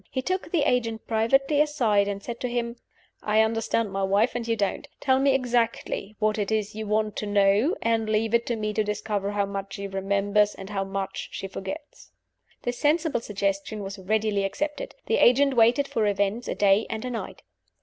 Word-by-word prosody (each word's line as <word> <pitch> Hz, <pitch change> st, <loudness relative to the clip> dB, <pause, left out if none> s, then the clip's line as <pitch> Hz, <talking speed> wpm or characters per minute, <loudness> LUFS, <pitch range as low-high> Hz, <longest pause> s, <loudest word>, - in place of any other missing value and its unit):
He 260 Hz, -, -3 dB
took 370 Hz, +2 st, -2 dB
the 325 Hz, -5 st, +2 dB
agent 230 Hz, -5 st, 0 dB
privately 270 Hz, +6 st, +2 dB
aside, 230 Hz, -10 st, +2 dB
and 200 Hz, 0 st, -4 dB
said 235 Hz, -1 st, -6 dB
to 250 Hz, -, -2 dB
him, 240 Hz, 0 st, -2 dB, 0.4 s
"I 215 Hz, +1 st, +3 dB
understand 225 Hz, -1 st, 0 dB
my 195 Hz, 0 st, -2 dB
wife, 200 Hz, +5 st, +2 dB
and 240 Hz, -1 st, -4 dB
you 230 Hz, -, +1 dB
don't. 200 Hz, -3 st, -2 dB
Tell 260 Hz, -1 st, +2 dB
me 275 Hz, 0 st, +3 dB
exactly 235 Hz, -4 st, -1 dB
what 215 Hz, 0 st, +1 dB
it 205 Hz, 0 st, -1 dB
is 215 Hz, -1 st, 0 dB
you 220 Hz, 0 st, -5 dB
want 215 Hz, 0 st, 0 dB
to 210 Hz, -, -3 dB
know, 205 Hz, -, +3 dB
and 225 Hz, -1 st, +1 dB
leave 220 Hz, +1 st, +1 dB
it 235 Hz, 0 st, +2 dB
to 235 Hz, -, 0 dB
me 215 Hz, -1 st, -2 dB
to 215 Hz, -, +1 dB
discover 205 Hz, -1 st, -2 dB
how 205 Hz, -1 st, +1 dB
much 195 Hz, 0 st, -5 dB
she 200 Hz, 0 st, -5 dB
remembers 200 Hz, +2 st, +1 dB
and 195 Hz, +2 st, -9 dB
how 195 Hz, -1 st, -1 dB
much 195 Hz, 0 st, -4 dB
she 195 Hz, -, -4 dB
forgets." 285 Hz, +11 st, -8 dB, 0.5 s
This 245 Hz, 0 st, -3 dB
sensible 305 Hz, -4 st, +1 dB
suggestion 200 Hz, 0 st, -2 dB
was 195 Hz, +1 st, -6 dB
readily 210 Hz, +1 st, 0 dB
accepted. 300 Hz, -, -3 dB
The 455 Hz, -, +1 dB
agent 270 Hz, +2 st, +5 dB
waited 240 Hz, +4 st, +4 dB
for 220 Hz, -5 st, 0 dB
events 205 Hz, +3 st, 0 dB
a -, -, -2 dB
day 200 Hz, +1 st, +3 dB
and 220 Hz, +2 st, -4 dB
a 250 Hz, -, -3 dB
night. 230 Hz, -, -6 dB
220 Hz, 200 wpm, -26 LUFS, 200-245 Hz, 0.5 s, agent